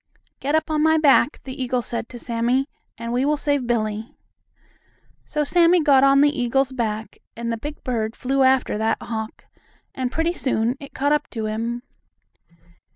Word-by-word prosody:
"Get 290 Hz, +3 st, 0 dB
up 315 Hz, 0 st, 0 dB
on 305 Hz, -1 st, +1 dB
my 315 Hz, +1 st, +4 dB
back," 295 Hz, -1 st, +3 dB
the 260 Hz, 0 st, -7 dB
eagle 250 Hz, -1 st, -1 dB
said 230 Hz, -1 st, -4 dB
to 245 Hz, -, -9 dB
Sammie, 240 Hz, +3 st, 0 dB, 0.3 s
"and 230 Hz, +1 st, -4 dB
we 250 Hz, +2 st, +1 dB
will 295 Hz, +2 st, +1 dB
save 285 Hz, -4 st, 0 dB
Billie." 220 Hz, -1 st, -2 dB, 1.1 s
So 300 Hz, -, -1 dB
Sammie 340 Hz, +2 st, +4 dB
got 275 Hz, -2 st, +5 dB
on 275 Hz, 0 st, +6 dB
the 290 Hz, -1 st, +3 dB
eagle's 265 Hz, +2 st, +1 dB
back, 220 Hz, -4 st, -3 dB, 0.2 s
and 235 Hz, 0 st, -3 dB
the -, -, -3 dB
big 295 Hz, +6 st, -8 dB
bird 225 Hz, -3 st, -2 dB
flew 270 Hz, +2 st, 0 dB
after 260 Hz, -5 st, +3 dB
that 220 Hz, 0 st, +1 dB
hawk, 220 Hz, -1 st, -6 dB, 0.5 s
and, 255 Hz, -1 st, -3 dB
pretty 325 Hz, +3 st, 0 dB
soon, 245 Hz, -6 st, 0 dB
it 280 Hz, -, -11 dB
caught 285 Hz, +2 st, +1 dB
up 295 Hz, 0 st, +1 dB
to 220 Hz, -3 st, -4 dB
him. 230 Hz, +3 st, -3 dB
260 Hz, 175 wpm, -22 LUFS, 230-290 Hz, 1.1 s, on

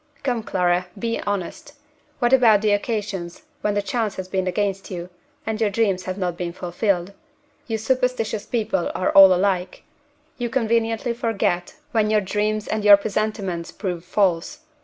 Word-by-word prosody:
Come, 245 Hz, -4 st, 0 dB
Clara, 180 Hz, -3 st, 0 dB
be 230 Hz, -1 st, -2 dB
honest! 205 Hz, +8 st, -4 dB, 0.4 s
What 240 Hz, 0 st, +1 dB
about 225 Hz, -6 st, +6 dB
the 210 Hz, -, +3 dB
occasions 205 Hz, -, -2 dB, 0.2 s
when 205 Hz, -1 st, 0 dB
the 205 Hz, -, 0 dB
chance 220 Hz, -1 st, -2 dB
has 190 Hz, -1 st, -5 dB
been 185 Hz, 0 st, -1 dB
against 195 Hz, +1 st, -1 dB
you, 180 Hz, -1 st, -6 dB, 0.3 s
and 220 Hz, 0 st, -3 dB
your 215 Hz, -, +3 dB
dreams 195 Hz, -3 st, 0 dB
have 185 Hz, 0 st, -4 dB
not 180 Hz, -3 st, -2 dB
been 175 Hz, -1 st, -4 dB
fulfilled? 180 Hz, +1 st, -1 dB, 0.5 s
You 225 Hz, -2 st, -1 dB
superstitious 240 Hz, -2 st, -1 dB
people 215 Hz, -6 st, -1 dB
are 185 Hz, -, 0 dB
all 195 Hz, -1 st, +9 dB
alike. 185 Hz, 0 st, 0 dB, 0.6 s
You 240 Hz, -1 st, -2 dB
conveniently 230 Hz, -1 st, 0 dB
forget 225 Hz, -, -1 dB, 0.2 s
when 220 Hz, -3 st, +2 dB
your 215 Hz, 0 st, +4 dB
dreams 210 Hz, +2 st, -1 dB
and 215 Hz, -1 st, -2 dB
your 205 Hz, -1 st, +9 dB
presentiments 200 Hz, -4 st, -3 dB
prove 180 Hz, -4 st, -4 dB
false. 180 Hz, -2 st, 0 dB
205 Hz, 160 wpm, -22 LUFS, 185-225 Hz, 0.6 s, all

